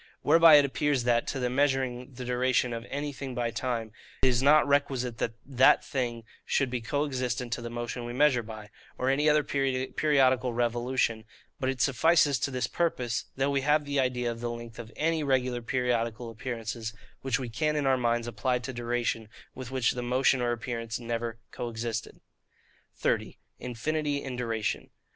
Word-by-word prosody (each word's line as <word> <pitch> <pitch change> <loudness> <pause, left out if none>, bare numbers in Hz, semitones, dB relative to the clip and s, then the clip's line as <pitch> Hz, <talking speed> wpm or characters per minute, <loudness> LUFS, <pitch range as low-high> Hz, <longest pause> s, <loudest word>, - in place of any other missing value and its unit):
Whereby 165 +1 +8
it 145 -1 +7
appears 140 -1 0
that, 120 -1 +2
to - - -2
the 125 - 0
measuring 130 -1 0
the 125 0 -6
duration 125 0 +1
of 115 +1 -6
anything 140 -2 -4
by 120 -1 -1
time, 115 -2 -3 0.3
it 130 - +6
is 125 -1 +2
not 150 +2 +5
requisite 135 -4 0
that 115 - -2
that 130 -1 +4
thing 120 -4 -2 0.2
should 135 -3 0
be 125 -2 -2
co 145 +6 -1
existent 125 -3 -2
to 120 - -3
the 120 - -5
motion 120 +1 -4
we 120 - -5
measure 130 -1 +3
by, 110 -1 -10 0.3
or 130 +1 +1
any 145 +3 +3
other 150 0 +4
periodical 130 -1 +1
revolution; 120 -1 0 0.4
but 130 -2 0
it 130 -2 -2
suffices 145 +1 +4
to - - 0
this 125 -1 -1
purpose, 125 -9 -1
that 135 +1 +1
we 140 -1 +1
have 150 +2 +2
the 145 -1 -1
idea 125 -2 0
of 115 - -7
the 120 - -2
length 115 -1 -8
of 115 -1 -8
ANY 160 +1 +1
regular 130 -3 +1
periodical 120 -1 -1
appearances, 115 -1 -5 0.3
which 135 -3 0
we 130 - -4
can 150 +7 -1
in 145 -2 0
our 135 -1 +4
minds 120 -2 0
apply 120 +2 0
to 130 +2 -6
duration, 120 -2 -2 0.2
with 130 -2 -8
which 130 -3 +1
the 125 - -4
motion 125 +1 +2
or 120 0 +1
appearance 115 -1 -4
never 115 -1 -3
co 120 - -4
existed. 115 -1 -4 0.7
30. - - -1 0.2
Infinity 145 +4 -2
in 130 -2 -5
Duration. 115 -3 -2
125 Hz, 180 wpm, -28 LUFS, 120-135 Hz, 0.7 s, Whereby